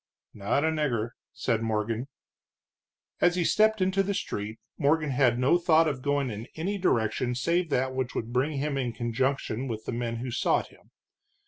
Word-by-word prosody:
"Not 105 +8 0
a 160 - +2
nigger," 125 -8 -1 0.2
said 115 -3 -1
Morgan. 110 +2 -1 1.1
As 175 0 +4
he 180 - +1
stepped 215 +3 +3
into 190 +1 +2
the 195 +1 -1
street, 105 - -4 0.2
Morgan 155 0 +2
had 125 -2 +3
no 130 +8 +3
thought 165 -1 +4
of 140 -4 -2
going 140 -2 0
in 110 +2 -6
any 195 +6 -2
direction 120 - +1
save 170 +7 +1
that 130 -1 0
which 130 -1 -3
would 115 +1 -3
bring 135 +5 +1
him 140 0 -1
in 120 -3 -2
conjunction 130 +1 -1
with 110 -3 -5
the - - -3
men 115 0 -2
who 120 +2 -4
sought - - +1
him. - - -22
130 Hz, 180 wpm, -28 LUFS, 115-160 Hz, 1.1 s, As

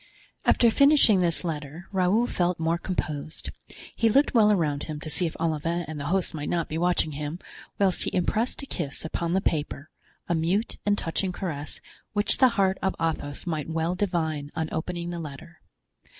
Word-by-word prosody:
After 235 -2 +5
finishing 280 -6 +5
this 175 -1 +1
letter 160 +1 -5
Raoul 195 +5 +3
felt 180 -6 0
more 165 +1 +1
composed; 155 -4 -4 0.4
he 230 - +3
looked 280 +7 +3
well 215 -3 +6
around 150 -7 +1
him 155 -2 -5
to 155 - -4
see 175 - +2
if 160 - -6
Olivain 165 +1 -1
and 155 -1 -5
the 140 - -4
host 190 0 0
might 150 -2 -4
not 170 -2 0
be 155 - -3
watching 175 -2 +2
him, 150 +2 -4 0.4
whilst 195 -2 +2
he - - -2
impressed 220 +9 0
a - - -4
kiss 160 - -4
upon 170 +1 -2
the 190 - +2
paper, 150 -3 -2 0.4
a 175 - +1
mute 175 +7 0
and 205 0 +3
touching 185 +2 -1
caress, 155 -5 -5 0.3
which 205 0 +2
the 260 - +8
heart 190 -1 +2
of 190 - 0
Athos 160 -3 -2
might 160 -3 -2
well 165 +2 0
divine 160 -6 -1
on 160 -1 -1
opening 170 +1 -3
the 170 - -4
letter. 160 +2 -9
170 Hz, 185 wpm, -26 LUFS, 155-190 Hz, 0.4 s, the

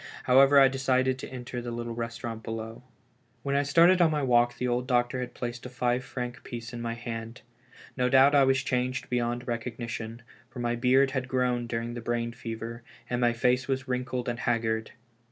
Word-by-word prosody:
However, 135 +2 +6
I 135 - +8
decided 130 -1 +1
to - - -7
enter 125 -1 -6
the 120 - -5
little 120 0 -4
restaurant 115 -1 -5
below. 115 0 -6 0.6
When 140 0 -1
I 140 - +4
started 170 +6 +5
on 170 - +6
my 150 -2 0
walk, 120 -1 +3
the 125 - -1
old 125 +1 -1
doctor 120 0 +1
had 125 -1 -5
placed 120 -1 -5
a 125 - -7
five 125 0 0
franc 125 -2 -6
piece 120 0 -7
in 120 - -5
my 115 0 -3
hand. 115 -1 -6 0.5
No 125 -1 +1
doubt 135 +2 +6
I 140 -1 +6
was 135 0 +2
changed 130 -2 -2
beyond 120 +1 -1
recognition, 115 -1 -5 0.3
for - - -13
my 120 0 -1
beard 130 +3 +3
had 130 -2 -2
grown 125 -2 0
during 115 0 -3
the 120 - -6
brain 120 0 -2
fever, 115 -1 -6 0.3
and 125 0 0
my 120 -1 +3
face 125 +2 +1
was 130 -1 -2
wrinkled 125 -1 -2
and 120 -1 -2
haggard. 110 -2 0
125 Hz, 195 wpm, -28 LUFS, 120-130 Hz, 0.6 s, I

